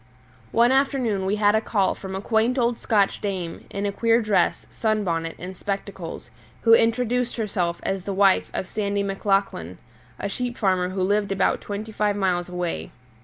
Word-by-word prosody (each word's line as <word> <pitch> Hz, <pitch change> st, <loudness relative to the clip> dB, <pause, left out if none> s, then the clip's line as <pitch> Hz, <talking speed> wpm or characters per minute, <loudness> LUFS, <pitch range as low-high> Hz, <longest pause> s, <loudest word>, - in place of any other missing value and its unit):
One 235 Hz, +2 st, +4 dB
afternoon 255 Hz, -8 st, +1 dB
we 200 Hz, -, +1 dB
had 205 Hz, -1 st, +3 dB
a 220 Hz, -, +3 dB
call 205 Hz, -3 st, +1 dB
from 190 Hz, -1 st, -7 dB
a 190 Hz, -, -3 dB
quaint 225 Hz, +4 st, +1 dB
old 235 Hz, -1 st, +1 dB
Scotch 205 Hz, -3 st, +1 dB
dame, 185 Hz, -5 st, -4 dB
in 200 Hz, 0 st, -3 dB
a 200 Hz, -, 0 dB
queer 230 Hz, +3 st, +3 dB
dress, 215 Hz, -4 st, +1 dB
sunbonnet, 180 Hz, -7 st, -1 dB
and 185 Hz, +1 st, -7 dB
spectacles, 200 Hz, +2 st, -5 dB, 0.3 s
who 230 Hz, -, +6 dB
introduced 240 Hz, +2 st, +2 dB
herself 180 Hz, -6 st, -1 dB
as 195 Hz, -1 st, -2 dB
the 200 Hz, -, -2 dB
wife 195 Hz, 0 st, +3 dB
of 185 Hz, -, -3 dB
Sandy 200 Hz, -1 st, -1 dB
Maclachlan, 195 Hz, -, -1 dB, 0.4 s
a -, -, -2 dB
sheep 245 Hz, +4 st, -3 dB
farmer 185 Hz, -3 st, +1 dB
who 185 Hz, 0 st, -2 dB
lived 205 Hz, +1 st, +1 dB
about 195 Hz, -, +1 dB
twenty 210 Hz, +2 st, -5 dB
five 210 Hz, -1 st, 0 dB
miles 180 Hz, -3 st, 0 dB
away. 180 Hz, -1 st, -3 dB
200 Hz, 170 wpm, -24 LUFS, 190-225 Hz, 0.4 s, who